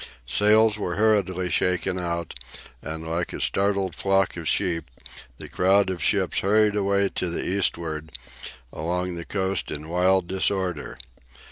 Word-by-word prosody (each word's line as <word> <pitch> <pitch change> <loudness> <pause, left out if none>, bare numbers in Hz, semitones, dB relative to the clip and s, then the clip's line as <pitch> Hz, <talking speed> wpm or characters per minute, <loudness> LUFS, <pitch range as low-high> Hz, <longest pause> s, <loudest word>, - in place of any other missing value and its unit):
Sails 105 - +4
were 90 -4 -2
hurriedly 95 -4 +1
shaken 90 0 0
out, 85 -2 -3 0.5
and 80 +1 -6
like 85 +2 -2
a - - -5
startled 100 -2 +1
flock 95 +2 +1
of 85 -2 -6
sheep 85 -6 0 0.5
the - - -5
crowd 95 +1 +2
of 90 -3 -5
ships 95 0 +2
hurried 105 +1 +3
away 100 -1 +2
to 90 - -2
the 85 - -3
eastward 80 -5 -1 0.6
along 90 +3 -2
the 85 -1 -6
coast 95 -1 -1
in 75 +1 -6
wild 90 +1 +2
disorder. 95 -3 -1
95 Hz, 140 wpm, -24 LUFS, 85-100 Hz, 0.6 s, Sails